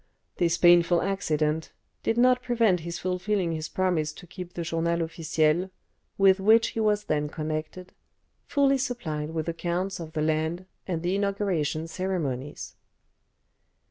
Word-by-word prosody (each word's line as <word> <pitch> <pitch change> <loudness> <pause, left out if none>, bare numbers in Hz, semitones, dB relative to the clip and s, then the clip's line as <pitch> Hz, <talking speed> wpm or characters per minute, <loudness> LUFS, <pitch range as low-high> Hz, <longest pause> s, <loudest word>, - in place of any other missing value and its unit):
This 170 -1 +2
painful 175 -1 +5
accident 160 -5 -1 0.3
did 225 - 0
not 250 +1 +4
prevent 230 -7 +2
his 170 +1 -5
fulfilling 185 0 -1
his 155 -1 -4
promise 175 -5 0
to 180 - -12
keep 180 0 -9
the 170 - -4
"Journal 170 0 0
Officiel," 165 +1 0 0.5
with 195 0 +5
which 220 +3 +5
he - - -5
was 210 -1 +2
then 150 -3 -1
connected, 155 +4 -5 0.5
fully 275 -1 +3
supplied 160 - -3
with 160 -1 -3
accounts 175 +3 -2
of 160 -2 -8
the 155 -1 -1
land 160 +3 -1 0.2
and 170 -3 -2
the 175 +2 0
inauguration 195 -6 -1
ceremonies. 160 -7 -3
175 Hz, 140 wpm, -27 LUFS, 160-195 Hz, 0.5 s, painful